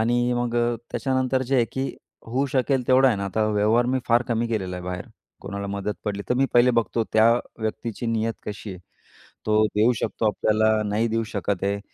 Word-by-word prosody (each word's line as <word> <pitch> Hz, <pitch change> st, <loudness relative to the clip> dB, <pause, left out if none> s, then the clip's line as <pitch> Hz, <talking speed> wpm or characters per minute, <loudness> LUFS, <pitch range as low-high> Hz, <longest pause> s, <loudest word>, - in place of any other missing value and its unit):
आणि 120 Hz, +2 st, +2 dB
मग 120 Hz, -1 st, -1 dB
अ, 120 Hz, 0 st, +1 dB
त्याच्यानंतर 130 Hz, -1 st, 0 dB
जे 135 Hz, -, +3 dB
आहे 120 Hz, -, +4 dB
की 130 Hz, -, -2 dB, 0.4 s
होऊ 130 Hz, +5 st, 0 dB
शकेल 130 Hz, -1 st, +1 dB
तेवढं 130 Hz, +1 st, +6 dB
आहे 115 Hz, -, +1 dB
ना 100 Hz, -, -3 dB
आता 110 Hz, +3 st, 0 dB
व्यवहार 110 Hz, +3 st, +2 dB
मी 130 Hz, -, +2 dB
फार 120 Hz, +1 st, +4 dB
कमी 115 Hz, 0 st, 0 dB
केलेला 95 Hz, -5 st, -2 dB
आहे 90 Hz, -, -7 dB
बाहेर 90 Hz, -1 st, -5 dB, 0.3 s
कोणाला 100 Hz, 0 st, -5 dB
मदत 100 Hz, +1 st, -3 dB
पडली, 100 Hz, -1 st, -2 dB
तर 125 Hz, -, +2 dB
मी 135 Hz, +2 st, +2 dB
पहिले 120 Hz, +1 st, +6 dB
बघतो 115 Hz, 0 st, 0 dB
त्या 110 Hz, +1 st, +6 dB, 0.3 s
व्यक्तीची 110 Hz, +1 st, -3 dB
नियत 115 Hz, 0 st, 0 dB
कशी 105 Hz, 0 st, -6 dB
आहे. 95 Hz, -, -8 dB, 0.7 s
तो 110 Hz, 0 st, +4 dB
देऊ 110 Hz, +4 st, +4 dB
शकतो 110 Hz, -, -1 dB
आपल्याला, 110 Hz, +1 st, +2 dB
नाही 110 Hz, +3 st, +1 dB
देऊ 115 Hz, 0 st, 0 dB
शकत 100 Hz, -2 st, -2 dB
आहे 100 Hz, +1 st, -1 dB
115 Hz, 200 wpm, -24 LUFS, 105-120 Hz, 0.7 s, तेवढं